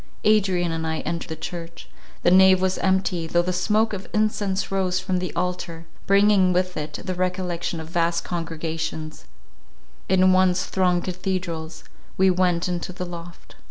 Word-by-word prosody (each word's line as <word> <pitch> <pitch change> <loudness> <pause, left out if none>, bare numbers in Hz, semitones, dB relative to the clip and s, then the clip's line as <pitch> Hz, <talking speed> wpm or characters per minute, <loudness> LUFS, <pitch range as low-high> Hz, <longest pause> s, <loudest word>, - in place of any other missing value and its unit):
Adrian 190 -5 +2
and 160 0 -2
I 160 0 -2
entered 170 0 -4
the 160 - -4
church; 165 +1 -7 0.4
the 175 - +4
nave 190 0 +7
was 190 0 0
empty, 185 -3 0
though 175 +1 +2
the 180 +1 -1
smoke 210 +5 +1
of 195 -1 -6
incense 205 -3 0
rose 185 -2 0
from 185 -1 -1
the 180 -1 -3
altar, 170 -1 -3 0.2
bringing 200 -2 +5
with 180 0 0
it 150 0 -5
the 185 - -3
recollection 180 -2 -2
of 160 - -7
vast 170 0 0
congregations, 160 - -4 0.8
in 185 0 +5
once 185 -1 +3
thronged 180 -2 +1
cathedrals; 175 -3 -4 0.3
we 190 0 +5
went 180 -1 +1
into 175 0 -3
the 180 0 -5
loft. 175 -1 -10
180 Hz, 160 wpm, -23 LUFS, 170-185 Hz, 0.8 s, nave